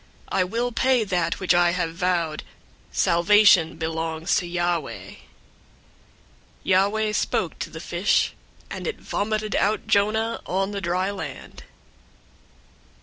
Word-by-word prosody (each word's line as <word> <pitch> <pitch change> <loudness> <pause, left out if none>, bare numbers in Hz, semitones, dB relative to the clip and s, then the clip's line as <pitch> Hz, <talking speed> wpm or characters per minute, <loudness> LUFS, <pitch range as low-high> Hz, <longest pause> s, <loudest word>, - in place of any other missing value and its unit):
I 185 - +2
will 235 +6 -2
pay 255 0 +2
that 175 -4 -1
which 185 -1 +2
I 175 0 +3
have 170 -3 -2
vowed. 170 -3 -1 0.5
Salvation 170 -2 +4
belongs 160 +1 -2
to 175 - -2
Yahweh." 175 -2 -2
002:010 - - -14 1.5
Yahweh 205 +3 +2
spoke - - -1
to - - -4
the - - -9
fish, - - +1 0.4
and - - -5
it 465 - -4
vomited 215 0 -2
out 210 0 +1
Jonah 220 +3 +1
on 195 +2 -1
the 200 -1 -4
dry 185 +2 -1
land. 200 - -8
185 Hz, 125 wpm, -24 LUFS, 170-210 Hz, 1.5 s, Salvation